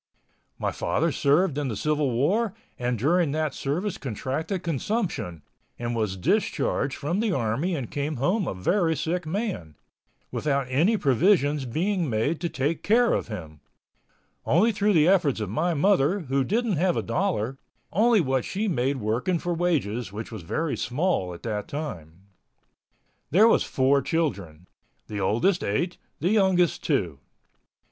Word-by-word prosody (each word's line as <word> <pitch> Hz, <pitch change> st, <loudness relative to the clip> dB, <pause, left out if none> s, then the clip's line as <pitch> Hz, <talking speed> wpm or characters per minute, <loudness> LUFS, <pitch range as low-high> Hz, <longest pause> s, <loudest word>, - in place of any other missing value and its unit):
My -, -, -1 dB
father -, -, 0 dB
served 150 Hz, +1 st, +2 dB
in 145 Hz, -, -1 dB
the 115 Hz, -, -3 dB
Civil 150 Hz, +4 st, 0 dB
War 185 Hz, -, +1 dB, 0.2 s
and 125 Hz, 0 st, -1 dB
during 155 Hz, -, +2 dB
that 155 Hz, -2 st, -1 dB
service 175 Hz, +8 st, -2 dB
contracted 140 Hz, -, -3 dB
consumption 165 Hz, -, -2 dB, 0.3 s
and 120 Hz, 0 st, -3 dB
was 105 Hz, -4 st, -1 dB
discharged 140 Hz, -, 0 dB
from 170 Hz, +7 st, -2 dB
the 220 Hz, -1 st, +1 dB
army 135 Hz, +6 st, 0 dB
and 130 Hz, -7 st, -5 dB
came 145 Hz, +2 st, -2 dB
home 180 Hz, -, 0 dB
a -, -, -3 dB
very 165 Hz, -, +1 dB
sick 165 Hz, +3 st, -2 dB
man, 180 Hz, -, -3 dB, 0.6 s
without 140 Hz, -2 st, 0 dB
any 175 Hz, -, +3 dB
provisions 145 Hz, -, +2 dB
being 170 Hz, -, -1 dB
made 120 Hz, +9 st, 0 dB
to 170 Hz, -, -1 dB
take 145 Hz, +4 st, -1 dB
care 235 Hz, +3 st, +3 dB
of -, -, -1 dB
him—only 105 Hz, -, -3 dB
through 205 Hz, 0 st, +1 dB
the 160 Hz, -2 st, +5 dB
efforts 175 Hz, -10 st, +3 dB
of 105 Hz, -3 st, -3 dB
my 170 Hz, +9 st, 0 dB
mother, 190 Hz, +2 st, +3 dB
who 135 Hz, -3 st, 0 dB
didn't 215 Hz, -, 0 dB
have 175 Hz, +2 st, +2 dB
a -, -, -1 dB
dollar, 135 Hz, -, -1 dB, 0.3 s
only 225 Hz, +3 st, +4 dB
what 130 Hz, -4 st, 0 dB
she 210 Hz, +3 st, -2 dB
made 135 Hz, -5 st, 0 dB
working 120 Hz, -, 0 dB
for 175 Hz, +1 st, -2 dB
wages 130 Hz, -, -1 dB
which 110 Hz, +3 st, -7 dB
was 110 Hz, -, -6 dB
very 155 Hz, -, -2 dB
small 130 Hz, -, -1 dB
at 85 Hz, -, -10 dB
that 105 Hz, -3 st, -3 dB
time. 90 Hz, -, -6 dB, 1.1 s
There 205 Hz, +9 st, +6 dB
was -, -, +4 dB
four 135 Hz, +1 st, +2 dB
children—the 100 Hz, -, -4 dB
oldest 145 Hz, -, +2 dB
eight, 170 Hz, -, -1 dB, 0.2 s
the 180 Hz, -, +1 dB
youngest 190 Hz, -5 st, +3 dB
two. 90 Hz, -, 0 dB
150 Hz, 150 wpm, -26 LUFS, 120-180 Hz, 1.1 s, There